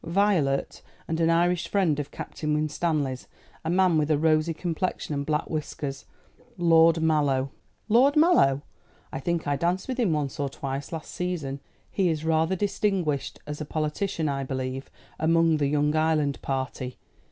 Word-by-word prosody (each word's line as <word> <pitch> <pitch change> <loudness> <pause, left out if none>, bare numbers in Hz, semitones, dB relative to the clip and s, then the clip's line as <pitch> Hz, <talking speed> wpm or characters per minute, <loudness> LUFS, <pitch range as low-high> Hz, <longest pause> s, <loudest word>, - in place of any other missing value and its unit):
"Violet, 165 -7 +1 0.3
and 160 0 -2
an 165 0 +3
Irish 175 +1 +2
friend 175 -8 +1
of 145 - -4
Captain 150 -1 -3
Winstanley's 150 -3 -1 0.4
a 160 - -2
man 180 -2 +3
with 150 0 0
a 155 - +3
rosy 155 +1 +2
complexion 165 -1 -3
and 140 0 -3
black 150 0 0
whiskers 145 -3 -4 0.5
Lord 165 -1 +5
Mallow." 140 -4 +2 0.4
"Lord 250 +6 +5
Mallow! 300 - +4 0.5
I - - -4
think 170 +3 -1
I 145 -1 +1
danced 180 +4 0
with 260 -1 -3
him 220 -8 +2
once 145 -3 -2
or 140 -1 0
twice 135 +1 -5
last 160 -2 -6
season. 160 -7 -3 0.3
He 190 -3 +1
is 160 -1 -2
rather 160 +3 +2
distinguished 195 -7 -1
as 150 +1 -6
a - - -1
politician, 155 +3 -2
I 135 -1 -1
believe, 130 0 -4 0.3
among 165 0 +3
the 145 -2 +1
young 150 +1 +1
Ireland 155 -3 +1
party. 130 -1 -3
155 Hz, 160 wpm, -26 LUFS, 145-170 Hz, 0.5 s, Lord